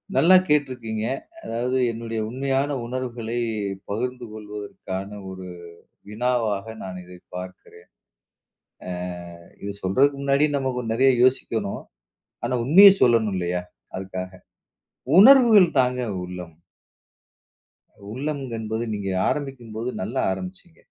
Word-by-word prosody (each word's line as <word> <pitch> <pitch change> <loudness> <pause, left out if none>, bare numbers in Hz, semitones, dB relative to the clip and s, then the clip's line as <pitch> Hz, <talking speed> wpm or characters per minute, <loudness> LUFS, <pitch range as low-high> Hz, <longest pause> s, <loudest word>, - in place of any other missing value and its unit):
நல்லா 185 +3 +6
கேட்டுருக்கீங்க. 125 -8 0 0.4
அதாவது 125 +3 -1
என்னுடைய 115 0 -5
உண்மையான 135 +3 -1
உணர்வுகளை 120 -2 -4 0.5
பகிர்ந்து 125 +4 -3
கொள்வதற்கான 105 -2 -7 0.2
ஒரு 95 -1 -8 0.6
வினாவாக 110 -3 0 0.2
நான் 95 -1 -6
இதைப் 90 0 -15
பார்க்கிறேன். 90 -1 -10 1.0
அ, - - -5 0.7
இதைச் 100 0 -7
சொல்றதுக்கு 135 +10 +3
முன்னாடி 140 +1 +3
நமக்கு 130 -2 -2
நிறைய 130 +4 +4
யோசிக்கணும். 115 -5 0 0.6
ஆனா - - -1
உண்மையைச் 195 +8 +8
சொல்லணும் 115 -4 +4
இல்லையா? 90 0 -1 0.4
அதுக்காக. 95 -1 -6 0.9
உணர்வுகள் 220 -6 +8
தாங்க 125 0 +1 0.2
உள்ளம். 90 -2 -8 1.6
உள்ளம் 145 +5 -3 0.2
என்பது 110 +1 -3
நீங்க 100 -2 -3 0.2
ஆரம்பிக்கும்போது 125 -5 -3
நல்லா 120 +8 -2
ஆரம்பிச்சீங்க. 95 - -7
115 Hz, 100 wpm, -24 LUFS, 100-135 Hz, 1.6 s, உண்மையைச்